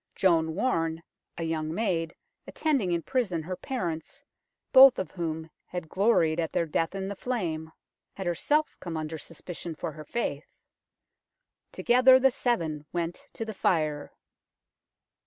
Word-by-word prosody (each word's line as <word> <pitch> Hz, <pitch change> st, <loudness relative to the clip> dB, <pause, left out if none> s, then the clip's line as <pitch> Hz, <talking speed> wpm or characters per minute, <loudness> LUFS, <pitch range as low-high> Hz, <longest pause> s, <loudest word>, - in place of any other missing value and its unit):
Joan 160 Hz, -4 st, +2 dB
Warne, 165 Hz, -7 st, 0 dB, 0.3 s
a 165 Hz, -, -3 dB
young 160 Hz, -1 st, -2 dB
maid, 170 Hz, -4 st, -1 dB, 0.3 s
attending 275 Hz, -, 0 dB
in 170 Hz, -1 st, 0 dB
prison 205 Hz, -11 st, -1 dB
her 180 Hz, +3 st, -4 dB
parents, 175 Hz, -, -4 dB, 0.5 s
both 265 Hz, -1 st, +9 dB
of 185 Hz, -, -3 dB
whom 160 Hz, -2 st, -4 dB, 0.2 s
had 175 Hz, -3 st, -6 dB
gloried 175 Hz, -5 st, +3 dB
at 165 Hz, -2 st, -1 dB
their 170 Hz, -, +1 dB
death 165 Hz, +3 st, -1 dB
in 190 Hz, 0 st, -3 dB
the 200 Hz, -, -4 dB
flame, 170 Hz, -10 st, -3 dB, 0.4 s
had 190 Hz, -, -5 dB
herself 295 Hz, -, +1 dB
come 170 Hz, -3 st, -5 dB
under 155 Hz, 0 st, -4 dB
suspicion 165 Hz, +1 st, -8 dB
for 160 Hz, -, -4 dB
her 155 Hz, +1 st, -10 dB
faith. 235 Hz, +10 st, -4 dB, 1.2 s
Together 255 Hz, +2 st, +6 dB
the 265 Hz, 0 st, +4 dB
seven 160 Hz, -, -1 dB
went 170 Hz, -1 st, -3 dB
to 225 Hz, -, -4 dB
the 220 Hz, -, -5 dB
fire. 155 Hz, -6 st, 0 dB
170 Hz, 140 wpm, -28 LUFS, 160-220 Hz, 1.2 s, both